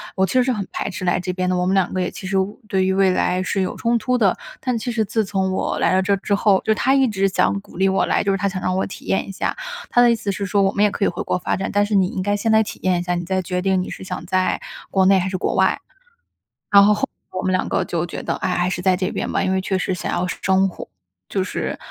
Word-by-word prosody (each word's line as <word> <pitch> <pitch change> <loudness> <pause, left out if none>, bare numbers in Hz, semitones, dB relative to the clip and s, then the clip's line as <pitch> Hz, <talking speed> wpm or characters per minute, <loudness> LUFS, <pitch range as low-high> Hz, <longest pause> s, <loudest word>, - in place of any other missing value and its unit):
我 190 - +1
其 185 - -4
实 255 -1 +4
是 255 0 +1
很 200 -5 -4
排 - - -3
斥 185 - -6
来 175 -1 +1
这 180 0 -3
边 185 0 -1
的， 185 - +1
我 180 - 0
们 185 - +1
两 190 -2 +2
个 185 - -2
也 180 - -2
其 190 - -8
实 195 +1 0
未 190 +2 0
对 190 -2 +1
于 190 - +1
未 195 0 +3
来 180 0 +1
是 190 +1 -1
有 185 - -3
冲 235 +1 +1
突 250 +3 0
的。 200 -5 +3 0.2
但 250 -2 -1
其 240 +2 -3
实 225 -2 +1
自 215 +1 -1
从 190 -1 -1
我 185 - -1
来 - - +2
到 190 - +3
这 200 +2 +2
儿 - - +2
之 200 +1 0
后 200 -1 +3
就 220 - +2
他 260 +5 +2
一 270 -1 +4
直 195 -3 +1
想 195 +1 +1
鼓 - - -17
励 190 +1 +3
我 190 - +2
来， - - +1
就 200 - +1
是 195 - +1
他 200 +1 0
想 185 -1 -4
让 185 0 0
我 190 - 0
体 - - -10
验 195 - 0
一 195 - -6
下。 - - -2 0.3
他 - - +2
的 240 -1 +6
意 - - +3
思 205 -3 -3
是 200 +1 -3
说 200 +1 +1
我 195 0 +3
们 205 - +1
也 210 - +3
可 200 - -3
以 - - +4
回 175 - -3
国 - - -1
发 - - -1
展， 190 - -3
但 205 0 +3
是 205 0 -1
你 190 -2 +4
应 185 - -4
该 205 +2 0
先 225 +2 0
来 220 0 +5
体 215 - -5
验 185 -2 +2
一 - - -3
下， 175 0 -1
你 175 0 -3
再 190 +1 0
决 180 0 -3
定 190 -1 +2
你 - - -5
是 - - -8
想 - - -4
在 185 0 +1 0.3
国 190 -1 +3
内 195 +1 +6
还 185 +1 -1
是 185 - -2
国 - - -1
外。 - - +2 0.9
然 200 -1 +8
后 210 +1 +5
后 - - -6 0.3
来 185 - -4
我 - - -2
们 185 - +1
两 185 - 0
个 - - 0
就 170 0 -2
觉 - - -6
得： - - -2
“唉， - - -1
还 180 0 +1
是 180 - -3
在 185 0 +3
这 185 +1 -1
边 - - -3
吧。” - - 0
因 190 -1 0
为 190 - +1
确 190 0 -1
实 185 +1 -1
想 180 - -4
要 180 - 0
生 190 +1 +1
活 180 - -9 0.4
就 195 - -1
是 - - -3
190 Hz, 350 characters per minute, -21 LUFS, 185-205 Hz, 0.9 s, 然